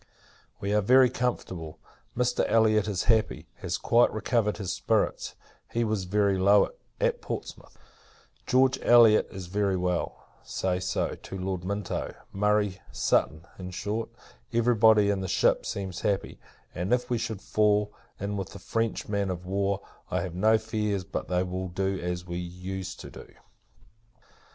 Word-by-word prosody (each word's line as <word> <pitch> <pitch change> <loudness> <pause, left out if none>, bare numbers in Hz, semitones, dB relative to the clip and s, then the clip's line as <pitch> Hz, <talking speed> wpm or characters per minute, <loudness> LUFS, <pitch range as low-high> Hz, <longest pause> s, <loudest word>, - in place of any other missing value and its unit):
We 100 +1 -2
are 105 - +3
very 125 +4 +5
comfortable. 90 -10 -3 0.4
Mr. 125 0 +1
Elliot 110 -2 +3
is 100 -5 -1
happy, 110 -2 +1
has - - -3
quite 120 +1 +3
recovered 110 -1 0
his 95 -3 -3
spirits; 100 +3 0 0.4
he 120 - 0
was 105 -4 -1
very 100 0 +2
low, 100 +2 +5 0.3
at - - +1
Portsmouth. - - -7 0.7
George 130 +1 +3
Elliot 115 -3 +6
is 95 -2 -7
very 100 +1 0
well; 90 -1 -2 0.2
say 90 -1 -1
so, 90 - -1
to 95 - -8
Lord 95 -1 -3
Minto. 100 +1 -3 0.2
Murray, 105 -1 +1
Sutton 80 +2 +1
in 90 0 -6
short, 105 +5 -3 0.4
every 120 +1 +3
body 105 -2 +5
in 100 -1 -1
the 95 - -3
ship, - - +2
seems 95 -3 -4
happy; 100 -3 -1 0.3
and, 90 +5 -3
if 125 0 0
we 120 - +1
should 110 -3 -3
fall 105 0 +1 0.3
in 100 +1 -3
with 95 -2 -5
a - - -8
French 115 -1 -2
man 100 -2 -1
of 90 -1 -4
war, 100 +1 0 0.3
I - - 0
have 90 - -5
no 110 +5 +4
fears 105 -3 -2
but - - -5
they 90 0 +1
will 95 0 -4
do 95 +1 -2
as 90 0 -3
we 85 -1 -5
used 90 +2 -6
to - - -10
do. - - -12
100 Hz, 160 wpm, -27 LUFS, 95-110 Hz, 0.7 s, Elliot